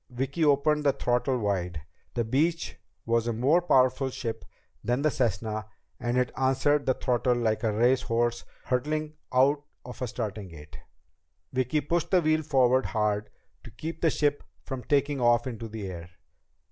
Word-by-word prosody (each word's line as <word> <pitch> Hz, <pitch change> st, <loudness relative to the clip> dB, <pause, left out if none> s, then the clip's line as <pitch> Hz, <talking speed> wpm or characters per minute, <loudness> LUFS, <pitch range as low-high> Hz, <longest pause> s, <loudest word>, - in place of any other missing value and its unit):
Vicki 135 Hz, +5 st, -2 dB
opened 150 Hz, +1 st, +3 dB
the 140 Hz, -2 st, +3 dB
throttle 125 Hz, +2 st, 0 dB
wide. 90 Hz, -7 st, -2 dB, 0.3 s
The 120 Hz, -, +1 dB
Beech 155 Hz, +9 st, 0 dB, 0.3 s
was 115 Hz, 0 st, +1 dB
a 120 Hz, -, 0 dB
more 135 Hz, +10 st, +3 dB
powerful 130 Hz, -4 st, +3 dB
ship 115 Hz, -3 st, -5 dB, 0.4 s
than 125 Hz, +4 st, 0 dB
the 155 Hz, -, +3 dB
Cessna 110 Hz, -3 st, -1 dB, 0.3 s
and 120 Hz, +1 st, -1 dB
it 125 Hz, -1 st, +1 dB
answered 135 Hz, +2 st, +2 dB
the 130 Hz, -, +3 dB
throttle 125 Hz, 0 st, +1 dB
like 110 Hz, -3 st, 0 dB
a 110 Hz, -2 st, +1 dB
race 120 Hz, +4 st, +3 dB
horse 120 Hz, -1 st, 0 dB, 0.2 s
hurtling 150 Hz, +4 st, -1 dB, 0.2 s
out 135 Hz, +3 st, +3 dB, 0.2 s
of 125 Hz, +1 st, -9 dB
a 125 Hz, -, -1 dB
starting 110 Hz, -4 st, -4 dB
gate. 75 Hz, -4 st, -12 dB, 0.7 s
Vicki 130 Hz, +4 st, +1 dB
pushed 170 Hz, +3 st, -1 dB
the 185 Hz, -, +4 dB
wheel 155 Hz, 0 st, +3 dB
forward 130 Hz, -3 st, +3 dB
hard 105 Hz, -1 st, 0 dB, 0.3 s
to -, -, -10 dB
keep 160 Hz, +9 st, -7 dB
the 165 Hz, -, +4 dB
ship 145 Hz, -1 st, 0 dB, 0.2 s
from 130 Hz, -2 st, -6 dB
taking 140 Hz, -1 st, +1 dB
off 120 Hz, -1 st, +4 dB
into 115 Hz, -3 st, -5 dB
the 110 Hz, -2 st, -6 dB
air. 85 Hz, -1 st, -8 dB
125 Hz, 165 wpm, -27 LUFS, 115-145 Hz, 0.7 s, the